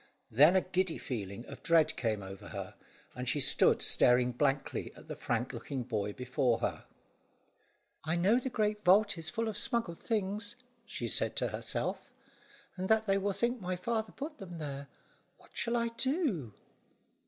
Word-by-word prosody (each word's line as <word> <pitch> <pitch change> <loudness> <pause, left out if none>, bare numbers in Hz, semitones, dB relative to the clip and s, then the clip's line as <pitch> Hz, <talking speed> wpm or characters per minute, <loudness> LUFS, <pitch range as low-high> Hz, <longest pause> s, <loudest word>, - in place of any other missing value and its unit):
Then 150 +10 +6
a 190 - +5
giddy 185 -2 -1
feeling 115 -3 -5
of - - -10
dread 160 -2 +4
came 110 -4 -1
over 95 0 -9
her, - - -6 0.4
and 125 +1 -2
she 145 - +1
stood 135 - +5
staring 125 0 +4
blankly 135 +2 -1
at - - -14
the - - -5
frank 120 +2 -2
looking 125 +2 -4
boy 105 -4 -2
before 125 -1 0
her. - - -2 1.2
"I 160 +2 0
know 195 +8 +4
the 260 - -3
great 210 -3 -1
vault 205 +3 +5
is 160 - -4
full 230 -1 -2
of 220 - -3
smuggled 230 -8 -1
things," 215 +2 -2 0.3
she 120 - -4
said 110 - +1
to - - 0
herself, - - -2 0.7
"and 185 +1 -3
that 220 0 +4
they 195 -1 +2
will 200 +1 0
think 235 +4 0
my 185 0 -2
father 220 +4 -2
put 300 +2 -7
them 175 -3 -8
there. 140 -2 -5 0.5
What - - -22
shall 235 0 0
I 235 0 0
do?" 230 - -1
180 Hz, 170 wpm, -32 LUFS, -, 1.2 s, Then